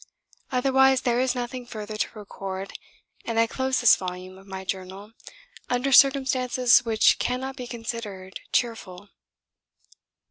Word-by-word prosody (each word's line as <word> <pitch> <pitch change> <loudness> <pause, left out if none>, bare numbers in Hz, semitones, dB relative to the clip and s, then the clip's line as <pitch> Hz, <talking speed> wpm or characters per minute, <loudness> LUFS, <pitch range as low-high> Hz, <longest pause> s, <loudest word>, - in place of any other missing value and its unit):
Otherwise 265 0 +3
there 240 -1 +1
is 255 0 +1
nothing 245 +1 -4
further 215 -2 -7
to 215 - -1
record, 195 -1 -7 0.5
and 230 -1 -2
I 230 - +5
close 260 +2 -1
this 240 - +7
volume 185 0 -7
of 195 +1 -16
my 190 0 -7
Journal 190 +2 -6 0.6
under 250 +2 0
circumstances 260 -2 +4
which 225 -2 +3
cannot 260 +2 -2
be 250 -2 -7
considered 225 -6 -7
cheerful. 205 -5 -2
235 Hz, 130 wpm, -25 LUFS, 195-255 Hz, 0.6 s, this